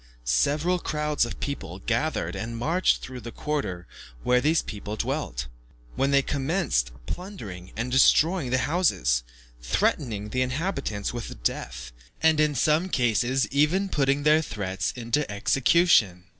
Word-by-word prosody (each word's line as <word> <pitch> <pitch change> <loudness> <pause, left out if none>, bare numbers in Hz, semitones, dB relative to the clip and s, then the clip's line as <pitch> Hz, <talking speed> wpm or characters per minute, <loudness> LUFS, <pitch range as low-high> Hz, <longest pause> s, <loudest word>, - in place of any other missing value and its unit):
Several 150 - +2
crowds 150 -6 0
of - - -8
people 115 - -4
gathered 115 - -1
together 100 - -4
and 115 +1 -5
marched 165 +10 +1
through 130 -1 -7
the 120 0 -8
quarter 115 -13 -3 0.4
where 125 0 +3
these 155 +4 +2
people 105 0 -6
dwelt, 60 - -3 0.5
when 135 +1 +1
they 140 -1 +4
commenced 135 - 0
plundering 110 - -7
and 120 +3 -2
destroying 155 +3 +4
the 130 - +2
houses, 130 - +2 0.4
threatening 105 - 0
the 130 +3 -1
inhabitants 130 - -2
with 115 - -7
death, - - -3 0.3
and, 160 -1 +3
in 150 -1 +2
some 155 +8 +2
cases, 120 - +1
even 155 +8 +2
putting 140 -2 +1
their 155 +1 +5
threats 95 -9 -3
into 120 +4 -1
execution. 120 - +3
130 Hz, 140 wpm, -26 LUFS, 105-150 Hz, 0.5 s, their